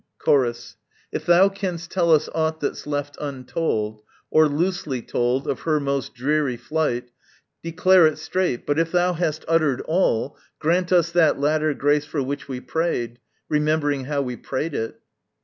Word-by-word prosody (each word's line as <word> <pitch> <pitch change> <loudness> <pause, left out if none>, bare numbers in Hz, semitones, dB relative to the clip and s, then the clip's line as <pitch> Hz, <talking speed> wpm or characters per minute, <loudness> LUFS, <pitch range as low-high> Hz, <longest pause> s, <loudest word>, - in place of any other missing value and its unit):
Chorus. 120 -4 0 0.3
If - - -5
thou 175 +3 +6
canst 180 -3 -5
tell 170 -3 +2
us 155 -1 +4
aught 160 0 0
that's 145 - -4
left 145 -1 -3
untold, 130 -6 -3 0.3
Or 155 0 +5
loosely 150 -5 -2
told, 125 +2 -1
of 135 - -1
her 155 -2 +1
most 140 -3 -2
dreary 140 0 0
flight, 125 -2 -2 0.5
Declare 180 +1 +5
it 155 - -2
straight: 185 -10 -2
but 145 +2 +1
if 165 0 0
thou 180 0 +2
hast 160 -2 -2
uttered 155 -5 +2
all, 155 -7 0 0.2
Grant 175 +3 +1
us 170 -2 +3
that 170 -4 +3
latter 155 +1 +1
grace 145 +1 +2
for 150 -2 -2
which 140 +2 -4
we 130 -2 -4
prayed, 125 -7 -2 0.3
Remembering 150 -2 0
how 140 0 -1
we 125 -2 -4
prayed 150 +4 -3
it. 115 -4 -4
150 Hz, 160 wpm, -23 LUFS, 135-165 Hz, 0.5 s, thou